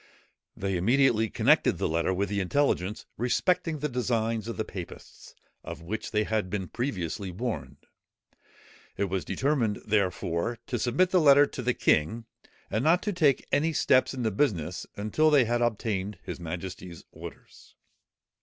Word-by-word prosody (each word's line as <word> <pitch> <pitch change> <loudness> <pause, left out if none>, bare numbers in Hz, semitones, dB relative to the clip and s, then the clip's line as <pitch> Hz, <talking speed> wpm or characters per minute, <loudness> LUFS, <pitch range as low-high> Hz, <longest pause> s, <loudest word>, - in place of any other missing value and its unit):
They 95 -1 -1
immediately 115 +2 +3
connected - - +3
the - - 0
letter 85 +3 0
with 95 +2 -1
the 100 0 -1
intelligence 100 -2 0
respecting 160 +6 +1
the 150 +1 -2
designs 115 -4 -1
of 115 - -5
the 110 - -2
papists, 90 -5 -10 0.3
of - - -8
which 110 +6 -4
they 105 -1 +1
had 110 -3 -1
been 95 -1 -3
previously 100 - -3
warned. 85 - -5 1.1
It 100 -2 -1
was 95 -2 -1
determined, 120 -1 0
therefore, 100 0 0
to 120 - -3
submit 140 +11 +2
the 180 - +4
letter 145 -1 +7
to 135 - -7
the 125 0 0
king, 100 +10 +1 0.5
and 110 - 0
not 170 +4 +3
to 210 - -1
take 150 -7 +2
any 160 +3 +2
steps 130 -3 +3
in 125 - -3
the 110 - +1
business 90 - -1
until 110 +10 +2
they 145 -5 +5
had 120 +1 0
obtained 105 -4 -1
his - - -6
majesty's 90 +1 -7
orders. - - -12
110 Hz, 155 wpm, -28 LUFS, 95-130 Hz, 1.1 s, letter